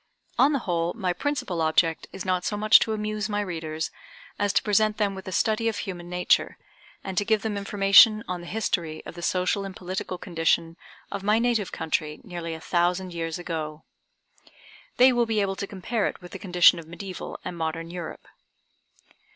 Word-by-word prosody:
On 270 +4 +6
the 285 - +2
whole 170 -1 0
my 185 -6 -1
principal 190 - -2
object 160 +1 +2
is 190 - -7
not 185 -1 0
so 210 - -2
much 215 +1 +7
to 220 - 0
amuse 215 -1 -2
my 205 0 -1
readers 160 -5 -3 0.5
as 205 -1 +2
to - - +2
present 215 0 +2
them 205 -2 +1
with 190 -1 -9
a - - -4
study 220 +5 +1
of 220 -2 -1
human 175 -4 -6
nature, 180 0 +1 0.5
and 190 - -5
to - - 0
give 215 -1 +1
them 220 -2 -2
information 200 +2 +6
on 180 -1 -3
the 175 - -10
history 170 -7 -2
of - - -8
the 175 - -9
social 185 +3 0
and 195 -1 -7
political 185 0 -4
condition 165 -2 0 0.4
of 200 - -4
my 210 +2 +3
native 230 -4 +1
country 155 -2 -2
nearly 170 -2 -5
a - - -8
thousand 175 +2 0
years 165 -1 -3
ago. 160 -3 -5 1.1
They 255 +1 +7
will 240 -1 +2
be 220 -1 +1
able 195 -1 0
to 200 - -4
compare 205 +3 -2
it - - -5
with 175 -2 -12
the 195 - -7
condition 180 -2 +5
of 160 - -11
mediæval 180 +2 -7
and 180 - -4
modern 165 0 -3
Europe. 175 -2 -7
185 Hz, 190 wpm, -26 LUFS, 170-210 Hz, 1.1 s, much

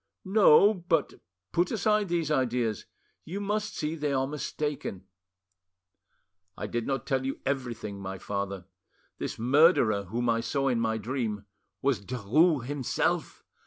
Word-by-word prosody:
"No. 200 0 +6
But 175 -5 0 0.4
put 175 +1 +2
aside 210 -2 +1
these 165 -3 0
ideas; 125 -5 0 0.4
you 185 +6 -5
must 210 +1 -2
see 155 +1 -2
they 150 -3 -2
are 135 0 +1
mistaken." 145 -7 -4 1.5
"I 105 - -4
did 115 +2 -3
not 135 -2 -2
tell 135 -3 0 0.2
everything, 120 -7 -3
my 95 0 -5
father: 100 -1 -4 0.5
this - - -4
murderer 120 - +4
whom 120 +6 -2
I 115 -1 +2
saw 135 +3 0
in 120 -3 +1
my 110 -1 0
dream—was 105 0 -3
Derues 130 - +2
himself! 140 -2 -1
130 Hz, 125 wpm, -28 LUFS, 110-155 Hz, 1.5 s, No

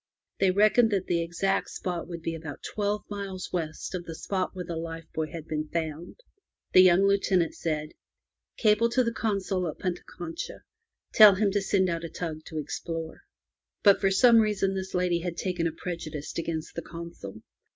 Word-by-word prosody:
They 195 - +4
reckoned 215 +4 +5
that 195 -3 0
the 170 -1 +1
exact 170 +4 0
spot 175 -2 -4
would 170 -2 -7
be 165 - -2
about 160 -3 -8
twelve 210 0 -2
miles 200 -2 -6
west 160 -1 -3
of 175 -2 -4
the 165 - -6
spot 190 +2 -2
where 180 -1 -5
the 170 -1 -5
life 165 0 -5
buoy 155 -1 -2
had 165 -2 -7
been 155 0 -2
found. 160 - -4 0.5
The 185 - +9
young 185 +1 +6
Lieutenant 195 -3 +2
said: 155 -2 -2 0.7
"Cable 220 +1 +4
to 255 +2 +2
the 230 -1 -1
Consul 195 -5 -1
at 155 - -5
Punta 180 -2 -3
Concha. 170 -2 -7 0.5
Tell 210 -3 +9
him 200 0 +2
to 205 +1 +1
send 195 -1 +2
out 170 -1 -2
a 165 - -4
tug 155 -3 -5
to 160 - -7
explore. 160 +2 -5 0.6
But 200 -2 +6
for 195 - +4
some 230 +4 +6
reason 210 -3 +1
this 190 -1 -4
lady 180 -1 +1
had 170 0 -4
taken 175 -3 -1
a - - -2
prejudice 160 -3 -6
against 165 -1 -3
the 170 - -4
Consul. 170 - -9
180 Hz, 185 wpm, -27 LUFS, 165-195 Hz, 0.7 s, The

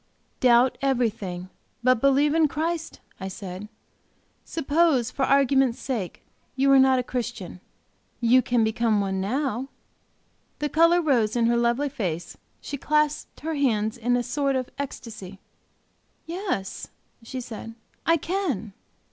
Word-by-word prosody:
"Doubt 245 0 +4
everything, 215 -9 -1 0.3
but 255 -2 +4
believe 275 +2 +4
in 320 -1 +4
Christ," 325 +3 -3 0.2
I 190 - -4
said. 190 +1 -7 0.7
"Suppose, 300 -5 +1
for 270 - 0
argument's 270 -3 +3
sake, 225 -10 -4 0.3
you 275 +1 +3
are 270 - +7
not 265 0 +5
a 250 - 0
Christian. 240 -8 -5 0.6
You 245 +2 +5
can 245 -2 +1
become 220 -1 +1
one 190 -1 -1
now." 260 +4 -1 0.9
The 295 - -2
color 335 +3 +4
rose 240 -8 +2
in 235 -1 +2
her 235 +1 +3
lovely 235 +4 +1
face; 175 - -4 0.3
she 285 - -5
clasped 300 +1 0
her 320 +1 -2
hands 225 -6 +1
in 245 +1 +1
a 245 - 0
sort 275 +2 0
of 255 -1 -2
ecstasy. 215 -8 -7 0.9
"Yes," 340 - -4 0.3
she 245 +3 -6
said, 225 -2 -8 0.3
"I 330 0 +4
can." 295 - -2
250 Hz, 135 wpm, -25 LUFS, 220-285 Hz, 0.9 s, are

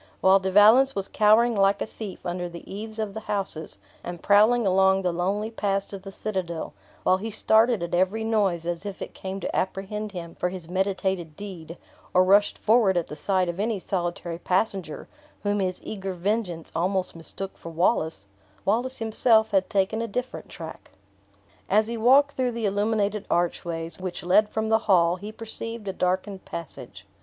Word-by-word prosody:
While 190 +1 +5
De 190 0 -2
Valence 220 +8 +6
was 195 -1 -2
cowering 220 +3 +4
like 195 0 +3
a - - -1
thief 215 -3 -9
under 175 0 -3
the 170 0 -11
eaves 215 +2 -7
of 215 -2 -3
the 220 - -5
houses, 195 - -4 0.3
and 175 -1 -7
prowling 215 +3 +5
along 190 0 +3
the 180 - +1
lonely 195 +6 -1
paths 200 -3 -1
to 195 - -6
the 195 +1 -10
citadel; 185 -5 -4 0.3
while 185 - +4
he 220 +4 -5
started 220 0 +3
at 170 - -5
every 190 +5 +1
noise, 200 -7 +1
as 170 0 -3
if 200 -2 -6
it - - -9
came 190 +1 -6
to - - -3
apprehend 205 +3 -2
him 170 -3 -7
for 180 - -1
his 180 -3 -8
meditated 185 -3 -1
deed, 175 -4 -8 0.4
or 185 - +7
rushed 200 +2 +4
forward 215 -4 +3
at 170 - +1
the 150 - -8
sight 185 +3 +1
of 175 +2 -4
any 220 +1 0
solitary 175 -2 -3
passenger, 185 -3 -1 0.4
whom 205 0 0
his 185 -2 -1
eager 195 -3 -4
vengeance 180 -2 -2
almost 185 +2 0
mistook 190 +4 -7
for 165 - -9
Wallace 160 - 0 0.4
Wallace 245 +6 0
himself 220 0 +3
had 190 -1 +2
taken 200 +3 +1
a 230 - -2
different 245 -3 -5
track. 160 -1 -9 0.8
As 215 +3 +4
he 235 +2 -4
walked 265 +5 +5
through 255 -3 -1
the 230 -1 -2
illuminated 205 0 0
archways, 170 -1 -1
which 185 -2 -5
led 210 +4 +4
from 220 0 -2
the 220 0 +4
hall, 175 -2 +4
he 205 +3 -7
perceived 225 0 -7
a 195 - -2
darkened 185 +2 -1
passage. 170 -3 -8
195 Hz, 180 wpm, -25 LUFS, 180-215 Hz, 0.8 s, or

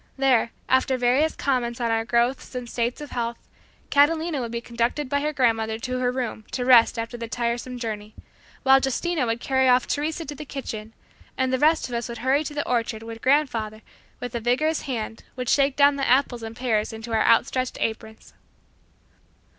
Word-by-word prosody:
There, 260 -4 +3 0.2
after 260 0 +2
various 255 +6 +2
comments 245 -3 -1
on 235 -1 0
our 225 0 0
growths 240 +3 0
and 250 -1 -4
states 240 +3 -2
of 295 - -8
health, 235 -1 -2 0.5
Catalina 315 +1 +3
would 235 -2 -4
be 235 - -2
conducted 235 +4 -2
by 285 +2 0
her 300 +1 0
grandmother 225 -5 +1
to 255 +2 -3
her 250 -1 +1
room 245 -4 -4
to 250 - -1
rest 245 -3 +6
after 230 +1 -4
the 230 -1 -5
tiresome 240 +2 -3
journey, 215 -3 -5 0.5
while 270 0 +6
Justina 280 +1 0
would 230 +1 -1
carry 265 +1 +2
off 250 0 +4
Teresa 315 +3 -2
to 290 - -6
the 290 - -8
kitchen, 225 -6 -6 0.4
and 260 0 0
the 260 - +1
rest 315 +3 +3
of 245 - -9
us 235 0 -3
would 235 - -6
hurry 275 +3 +3
to 295 - -5
the 290 - -2
orchard 230 -2 -1
where 230 0 -7
grandfather 230 -5 0 0.4
with 245 -1 -6
a 235 - -1
vigorous 265 +8 +1
hand 225 -3 -4
would 250 -1 -3
shake 275 -1 +3
down 285 0 +5
the 275 - -1
apples 255 -2 +2
and 225 0 -7
pears 230 -4 0
into 225 +1 -7
our 220 - +3
outstretched 255 +2 +2
aprons. 220 0 -4
245 Hz, 195 wpm, -24 LUFS, 230-270 Hz, 0.5 s, rest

